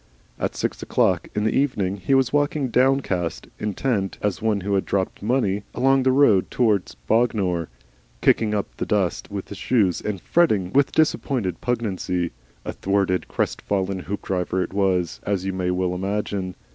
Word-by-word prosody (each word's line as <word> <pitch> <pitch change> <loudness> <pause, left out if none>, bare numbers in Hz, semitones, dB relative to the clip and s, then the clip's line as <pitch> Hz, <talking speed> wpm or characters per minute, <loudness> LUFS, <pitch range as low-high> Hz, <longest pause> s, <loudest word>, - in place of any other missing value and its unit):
At - - -2
six - - -2
o'clock - - +1
in 105 - 0
the 110 - +1
evening, 100 -9 0
he 100 +8 +1
was 130 -1 +2
walking 145 -2 +1
downcast, 125 -10 +1
intent, 105 -1 -1
as 105 -3 -1
one 110 -2 +1
who 100 +2 -2
had 95 - +2
dropped 95 -1 -2
money, 105 -3 +1
along 135 +1 +3
the 130 0 +3
road 130 -8 +4
towards 110 -6 +1
Bognor, 100 -8 +1 0.5
kicking 105 -2 +3
up 100 - -4
the - - -2
dust 100 -5 0
with 100 -2 -6
his 100 - -8
shoes 105 -9 +2
and 105 -3 -3
fretting 105 - +2
with 140 0 +3
disappointed 130 - 0
pugnacity. 95 -7 -1 0.3
A - - -3
thwarted, 95 -2 0
crestfallen 95 -1 -1
Hoopdriver 95 -2 -1
it - - -7
was, 95 -4 +1
as 100 -2 -2
you 95 - -1
may 90 -1 -1
well 90 0 0
imagine. 95 0 -2
100 Hz, 160 wpm, -23 LUFS, 95-120 Hz, 0.5 s, road